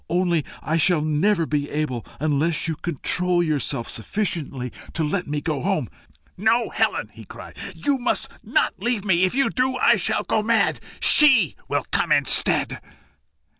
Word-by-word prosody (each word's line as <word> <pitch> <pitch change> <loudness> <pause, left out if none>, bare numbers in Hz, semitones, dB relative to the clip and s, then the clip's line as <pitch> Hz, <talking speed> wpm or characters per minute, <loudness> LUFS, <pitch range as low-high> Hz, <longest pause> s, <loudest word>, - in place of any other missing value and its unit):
"Only 175 -2 +1 0.2
I 155 +3 0
shall 165 +1 +3
never 165 +4 +1
be 145 -2 -2
able 145 -6 -3 0.2
unless 150 +2 0
you 160 - -2
control 175 +2 0
yourself 145 -7 -1
sufficiently 140 - -3 0.2
to 165 - -1
let 180 +5 -2
me 145 0 -3
go 150 -3 -2
home." 180 - -1 0.5
"No, 225 +4 +1
Helen!" - - -1
he - - -12
cried; - - -12 0.2
"you 285 -2 0
must 245 - -1 0.2
not - - +1
leave 235 -4 -1
me. 185 -2 +3
If 185 - -2
you 275 0 +2
do, 255 0 0
I - - +4
shall - - -1
go 220 - 0
mad. 225 +1 +1 0.2
SHE 260 - +5
will - - -1
come - - 0
instead." - - +3
170 Hz, 160 wpm, -22 LUFS, 150-210 Hz, 0.5 s, SHE